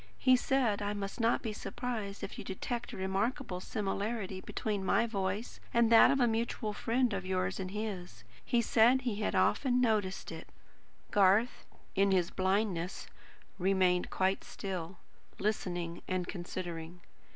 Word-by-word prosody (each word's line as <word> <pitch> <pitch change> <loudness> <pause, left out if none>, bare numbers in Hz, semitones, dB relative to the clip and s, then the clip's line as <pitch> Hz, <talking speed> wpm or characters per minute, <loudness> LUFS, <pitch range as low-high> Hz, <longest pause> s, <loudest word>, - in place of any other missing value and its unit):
He 255 -1 +5
said 245 -5 +1
I 205 0 -1
must 200 +1 -5
not 230 +1 +2
be 220 -3 -2
surprised 220 -3 -4
if - - -6
you - - -5
detected 235 +5 -4
a - - -8
remarkable 195 +2 -1
similarity 200 0 -3
between 205 -1 -3
my 230 +4 +3
voice 200 0 -3 0.2
and 235 -1 +4
that 225 - +8
of 275 - +2
a 245 - +5
mutual 225 -1 -1
friend 240 +2 +1
of 195 -1 -2
yours 185 0 -1
and 185 -1 -3
his. 190 - -5 0.2
He 235 -1 +1
said 240 +4 +5
he 240 -5 -2
had - - 0
often 250 -3 +3
noticed 215 -6 0
it." - - -8 0.6
Garth, 205 +4 +3 0.3
in 195 0 +3
his 180 -2 +2
blindness, 190 -2 0 0.5
remained 185 -1 +2
quite 190 +1 0
still; 185 -2 -5 0.4
listening 175 -5 -2
and 185 -1 -1
considering. 175 -2 -6
200 Hz, 150 wpm, -32 LUFS, 185-230 Hz, 0.6 s, that